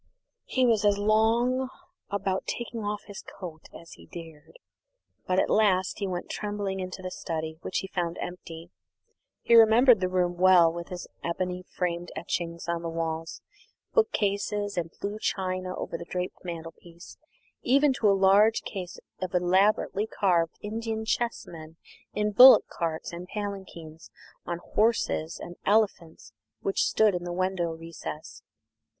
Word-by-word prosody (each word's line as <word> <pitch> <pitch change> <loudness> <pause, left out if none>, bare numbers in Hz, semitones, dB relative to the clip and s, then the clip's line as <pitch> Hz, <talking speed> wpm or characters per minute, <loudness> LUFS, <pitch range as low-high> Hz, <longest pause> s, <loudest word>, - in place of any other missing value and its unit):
He 260 -1 +1
was 225 -4 +3
as 205 -1 +3
long 230 +5 +2 0.4
about 195 -1 -2
taking 235 -1 -4
off 205 0 -3
his 205 -2 -9
coat 165 -4 -10
as 170 - -13
he - - -14
dared, 165 - -11 0.7
but 185 - +1
at - - +2
last 190 -3 +2
he 200 - -1
went 180 -1 -4
trembling 205 -2 -3
into 185 0 -6
the 185 - -4
study, 160 -2 -5
which - - -3
he 190 - -6
found 175 -3 -3
empty. 170 -1 -8 0.7
He - - +2
remembered 230 +1 +7
the 185 -1 0
room 180 -1 0
well, 180 -2 +6
with 170 +1 -7
its 180 -1 -5 0.2
ebony 180 +1 -3
framed 175 -1 -3
etchings 170 0 -4
on 170 0 -1
the 170 - -4
walls, 165 0 -4 0.5
bookcases 205 - 0
and 170 -2 -2
blue 205 +2 -4
china 185 -2 -2
over 165 - -5
the 170 - -7
draped 180 0 -4
mantelpiece, 170 0 -9 0.4
even 275 +2 +4
to 220 -4 +2
a 195 - +4
large 200 +3 +4
case 180 -3 -6 0.2
of 185 -1 -3
elaborately 195 +3 +2
carved 175 -6 +1
Indian 220 +1 -3
chessmen 170 -9 -3 0.4
in 210 0 0
bullock 255 +5 +9
carts 165 -1 -4
and 175 +1 -7
palanquins, 190 -6 -7 0.4
on 175 0 -3
horses 215 -7 +1
and 175 0 -9
elephants, 200 -6 0 0.3
which 195 - +1
stood 215 -2 +3
in 175 -1 -3
the 175 - -4
window 185 -1 -1
recess. 160 -1 -8
185 Hz, 145 wpm, -27 LUFS, 170-210 Hz, 0.7 s, bullock